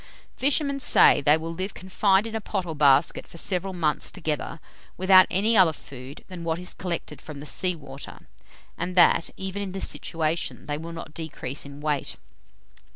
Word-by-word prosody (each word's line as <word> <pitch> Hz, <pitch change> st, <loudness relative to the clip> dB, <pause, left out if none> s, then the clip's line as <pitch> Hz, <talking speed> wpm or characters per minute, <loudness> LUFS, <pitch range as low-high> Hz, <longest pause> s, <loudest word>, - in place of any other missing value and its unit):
Fishermen 280 Hz, 0 st, +1 dB
say -, -, +6 dB
that -, -, -17 dB
they 150 Hz, +1 st, +6 dB
will 165 Hz, +1 st, -5 dB
live 185 Hz, +4 st, -4 dB
confined 190 Hz, +2 st, +2 dB
in 225 Hz, -, -6 dB
a 225 Hz, -, -2 dB
pot 190 Hz, -2 st, -3 dB
or 165 Hz, -, -4 dB
basket 145 Hz, +1 st, +3 dB
for -, -, -12 dB
several 185 Hz, +2 st, -1 dB
months 160 Hz, -5 st, -1 dB
together, 160 Hz, -3 st, -4 dB, 0.4 s
without 185 Hz, 0 st, +6 dB
any 210 Hz, +5 st, +2 dB
other 180 Hz, -5 st, +6 dB
food 135 Hz, 0 st, -11 dB
than 180 Hz, -3 st, -8 dB
what 165 Hz, -1 st, -1 dB
is 180 Hz, +1 st, -5 dB
collected 170 Hz, -5 st, -5 dB
from 150 Hz, -3 st, -9 dB
the 145 Hz, -, -8 dB
sea 180 Hz, +4 st, 0 dB
water; 140 Hz, -3 st, -10 dB, 0.5 s
and 180 Hz, +2 st, -3 dB
that, 175 Hz, -2 st, +5 dB
even 190 Hz, +1 st, -4 dB
in 195 Hz, -2 st, -5 dB
this 195 Hz, -, 0 dB
situation, 165 Hz, 0 st, -3 dB
they 145 Hz, -, -2 dB
will 165 Hz, +1 st, -7 dB
not 165 Hz, -2 st, -8 dB
decrease 155 Hz, -4 st, -5 dB
in 140 Hz, +1 st, -11 dB
weight. 150 Hz, -2 st, -1 dB
170 Hz, 185 wpm, -25 LUFS, 150-190 Hz, 0.5 s, say